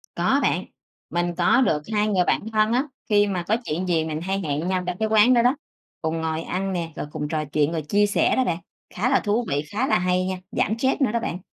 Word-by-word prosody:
Có -, -, +2 dB
bạn, -, -, +1 dB, 0.4 s
mình 175 Hz, +1 st, -1 dB
có 180 Hz, +9 st, +4 dB
được 155 Hz, -, +2 dB
2 210 Hz, 0 st, +2 dB
người 190 Hz, -4 st, +2 dB
bạn -, -, +1 dB
thân 215 Hz, +1 st, +3 dB
á, 255 Hz, -, +2 dB, 0.3 s
khi 205 Hz, 0 st, +4 dB
mà 185 Hz, -3 st, -2 dB
có 220 Hz, -, +2 dB
chuyện 170 Hz, +5 st, -2 dB
gì 165 Hz, -3 st, +1 dB
mình 155 Hz, 0 st, -4 dB
hay 195 Hz, +3 st, -1 dB
hẹn 155 Hz, 0 st, -2 dB
nhau 185 Hz, -1 st, 0 dB
trong 180 Hz, -, -2 dB
cái 220 Hz, -, 0 dB
quán 220 Hz, +3 st, +5 dB
đó 240 Hz, -, +5 dB
đó, 245 Hz, +4 st, +3 dB, 0.5 s
cùng 160 Hz, 0 st, -2 dB
ngồi 160 Hz, 0 st, -2 dB
ăn 190 Hz, +3 st, -3 dB
nè, 170 Hz, -2 st, -3 dB
rồi -, -, -5 dB
cùng 150 Hz, -, -4 dB
trò 155 Hz, 0 st, -2 dB
chuyện 150 Hz, +1 st, 0 dB
rồi 165 Hz, -2 st, -2 dB
chia 205 Hz, +8 st, +2 dB
sẻ 205 Hz, -, +2 dB
đó 260 Hz, -, +2 dB
bạn. 170 Hz, -6 st, -1 dB, 0.4 s
Khá 220 Hz, +7 st, 0 dB
là 270 Hz, -, +4 dB
thú 220 Hz, +3 st, 0 dB
vị, 140 Hz, +1 st, 0 dB
khá 255 Hz, +6 st, 0 dB
là 285 Hz, -, +3 dB
hay 180 Hz, 0 st, +1 dB
nha, 185 Hz, 0 st, -2 dB
giảm 225 Hz, +1 st, 0 dB
stress 265 Hz, +2 st, +1 dB
nữa 255 Hz, -, +3 dB
đó 235 Hz, -, 0 dB
bạn. 180 Hz, -5 st, -4 dB
185 Hz, 260 wpm, -23 LUFS, 165-215 Hz, 0.5 s, quán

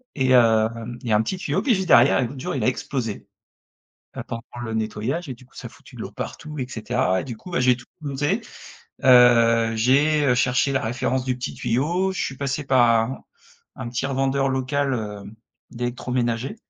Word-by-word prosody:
et 130 Hz, -2 st, +1 dB
hem, 115 Hz, -1 st, +3 dB
il 120 Hz, -, -5 dB
y -, -, 0 dB
a 105 Hz, -, +5 dB
un -, -, +3 dB
petit 110 Hz, -, -3 dB
tuyau. 180 Hz, -, -1 dB
Puis 250 Hz, -5 st, +2 dB
juste 190 Hz, -1 st, -2 dB
derrière 120 Hz, +3 st, +6 dB
et 125 Hz, -, +1 dB
l'autre 135 Hz, +3 st, -9 dB
jour -, -, -4 dB
il 130 Hz, -, -2 dB
a -, -, +2 dB
explosé, 125 Hz, -5 st, -3 dB, 0.9 s
heu, -, -, -3 dB
pendant 115 Hz, -, -5 dB, 0.2 s
le 115 Hz, -1 st, -4 dB
nettoyage 110 Hz, +9 st, -2 dB
et 130 Hz, -, -5 dB
du 125 Hz, +2 st, -17 dB
coup -, -, -29 dB
ça -, -, -9 dB
a -, -, -6 dB
foutu -, -, -17 dB
de -, -, -6 dB
l'eau -, -, -6 dB
partout 150 Hz, 0 st, -7 dB
et 130 Hz, -, -2 dB
cetera. 115 Hz, -5 st, 0 dB
Et -, -, -8 dB
du 120 Hz, -4 st, -6 dB
coup 180 Hz, -, -12 dB
bah 170 Hz, -, 0 dB
j'ai 125 Hz, 0 st, +4 dB
tout 125 Hz, 0 st, -14 dB, 0.2 s
démonté. 145 Hz, 0 st, -1 dB, 0.6 s
Heu, 115 Hz, -2 st, +5 dB
j'ai, 140 Hz, +6 st, +3 dB
heu, 125 Hz, -, +4 dB
cherché 125 Hz, +2 st, +2 dB
la 135 Hz, -, +1 dB
référence 125 Hz, +3 st, -1 dB
du 130 Hz, -1 st, 0 dB
petit 125 Hz, -, -5 dB
tuyau, 170 Hz, +11 st, 0 dB
je -, -, -3 dB
suis 135 Hz, -, -5 dB
passé 140 Hz, +1 st, -2 dB
par 130 Hz, -3 st, +4 dB
un 120 Hz, +4 st, -4 dB, 0.6 s
un 130 Hz, -3 st, -6 dB
petit 125 Hz, +2 st, -2 dB
revendeur 135 Hz, 0 st, 0 dB
local, 135 Hz, +1 st, 0 dB
heu, 105 Hz, -4 st, -5 dB, 0.5 s
d'électroménager 120 Hz, -, -2 dB
125 Hz, 210 wpm, -23 LUFS, 115-135 Hz, 0.9 s, derrière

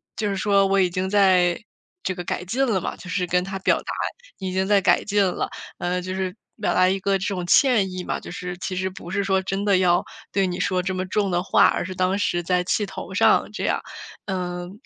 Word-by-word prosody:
就 210 Hz, -2 st, -1 dB
是 200 Hz, -, -1 dB
说 200 Hz, 0 st, +3 dB
我 195 Hz, 0 st, +2 dB
已 180 Hz, -, +3 dB
经 185 Hz, +2 st, -2 dB
在 185 Hz, -3 st, +4 dB, 0.4 s
这 185 Hz, -, -2 dB
个 180 Hz, -, -5 dB
改 180 Hz, -, -3 dB
进 250 Hz, +9 st, 0 dB
了 205 Hz, -8 st, 0 dB
嘛， -, -, -4 dB
就 -, -, -12 dB
是 180 Hz, -1 st, -1 dB
跟 180 Hz, +1 st, +1 dB
他 195 Hz, 0 st, -5 dB
表 -, -, +3 dB
达， -, -, -5 dB, 0.5 s
已 190 Hz, -2 st, -3 dB
经 190 Hz, +1 st, 0 dB
在 200 Hz, -1 st, +4 dB
改 -, -, +3 dB
进 205 Hz, -1 st, +2 dB
了。 185 Hz, -, -1 dB, 0.3 s
呃， 180 Hz, +1 st, -1 dB
就 185 Hz, +1 st, -5 dB
是 190 Hz, -1 st, -3 dB, 0.3 s
表 -, -, +1 dB
达 185 Hz, 0 st, +4 dB
一 195 Hz, +1 st, +1 dB
个 195 Hz, 0 st, +2 dB
这 190 Hz, -, -4 dB
种 185 Hz, -4 st, -2 dB
歉 215 Hz, -3 st, +4 dB
意 185 Hz, 0 st, -5 dB
嘛， -, -, -2 dB
就 -, -, -10 dB
是 180 Hz, 0 st, -5 dB
其 185 Hz, -, -4 dB
实 185 Hz, +1 st, -1 dB
不 185 Hz, -2 st, -10 dB
是 200 Hz, +1 st, 0 dB
说 190 Hz, -1 st, +1 dB
真 195 Hz, +2 st, -3 dB
的 200 Hz, -2 st, +4 dB
要 175 Hz, -1 st, +3 dB, 0.3 s
对 195 Hz, -1 st, +2 dB
你 180 Hz, 0 st, -4 dB
说 185 Hz, -2 st, +1 dB
这 185 Hz, +1 st, -2 dB
么 185 Hz, -, -1 dB
重 200 Hz, +1 st, 0 dB
的 175 Hz, -, +1 dB
话， -, -, +4 dB
而 -, -, 0 dB
是 185 Hz, +2 st, -5 dB
当 185 Hz, +1 st, +1 dB
时 175 Hz, -3 st, 0 dB
在 180 Hz, +1 st, +1 dB
气 205 Hz, +3 st, 0 dB
头 195 Hz, -, -8 dB
上 -, -, +3 dB
这 -, -, -4 dB
样。 -, -, 0 dB, 0.4 s
呃， 180 Hz, -2 st, -3 dB
感 -, -, -11 dB
185 Hz, 270 characters per minute, -23 LUFS, 180-195 Hz, 0.5 s, 在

